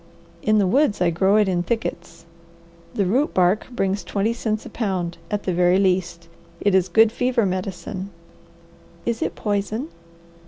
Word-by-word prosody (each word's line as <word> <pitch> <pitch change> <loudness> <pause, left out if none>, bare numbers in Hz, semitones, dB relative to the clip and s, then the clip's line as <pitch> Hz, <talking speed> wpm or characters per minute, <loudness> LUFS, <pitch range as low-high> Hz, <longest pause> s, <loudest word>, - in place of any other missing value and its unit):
In 215 0 +3
the 205 - +3
woods 250 +3 +2
I 175 -1 +2
grow 190 +4 +2
it 210 -1 +4
in 180 -2 +1
thickets. 175 -4 -4 0.7
The 200 - +1
root 255 +11 +1
bark 185 +3 +2
brings 195 -5 -1
twenty 205 +5 -1
cents 220 -2 -3
a - - -7
pound, 180 -6 -2
at 205 -1 -2
the 185 - -1
very 180 +1 +3
least. 180 -3 0 0.3
It 205 - +1
is 185 -1 +3
good 220 +5 +5
fever 245 -1 +1
medicine." 190 +1 -4 1.0
"Is 235 -1 -1
it - - -2
poison?" 210 +7 -2
195 Hz, 160 wpm, -22 LUFS, 180-220 Hz, 1.0 s, good